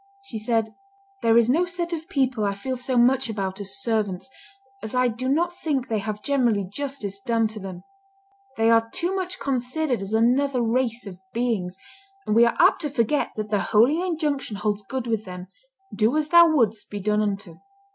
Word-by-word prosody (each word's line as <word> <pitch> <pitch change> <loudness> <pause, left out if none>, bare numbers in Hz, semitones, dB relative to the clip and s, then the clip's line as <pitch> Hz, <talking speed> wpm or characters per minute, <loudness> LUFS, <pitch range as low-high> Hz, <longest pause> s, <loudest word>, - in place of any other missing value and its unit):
She 235 - -6
said, 220 0 0 0.5
"There 230 0 +4
is 235 -1 +5
no 320 +8 +3
set 350 -1 -3
of 325 +2 -5
people 260 - 0
I 200 -1 0
feel 260 +6 -4
so 255 0 -2
much 255 +1 +3
about 195 -2 -3
as 200 +6 -3
servants, 215 -3 -1 0.5
as 220 +3 -6
I 250 0 +3
do 250 +3 -3
not 340 +5 +1
think 280 -7 -2
they 220 -2 0
have 210 +1 -5
generally 245 -8 +2
justice 205 -1 -5
done 225 +2 +1
to 215 0 -7
them; 185 -2 -8 0.7
they 225 +1 +4
are 225 0 +3
too 350 +9 -2
much 370 -1 -3
considered 260 -1 -1
as 195 +1 -5
another 250 +4 +2
race 240 0 0
of 185 -3 -9
beings, 220 -7 -1 0.5
and 210 - 0
we 235 +1 +7
are 235 - -1
apt - - +5
to 300 - -2
forget 275 +2 0
that 215 -1 -5
the 205 - +2
holy 245 - +3
injunction 305 - -2
holds 210 0 -1
good 255 +5 -5
with 225 -2 -2
them, 180 0 -8 0.5
'Do 225 +7 +2
as 305 -1 0
thou 340 +1 +8
wouldst 225 -9 +1
be 205 - -5
done 210 +2 +1
unto.'" 200 -5 -3
230 Hz, 195 wpm, -24 LUFS, 210-275 Hz, 0.7 s, thou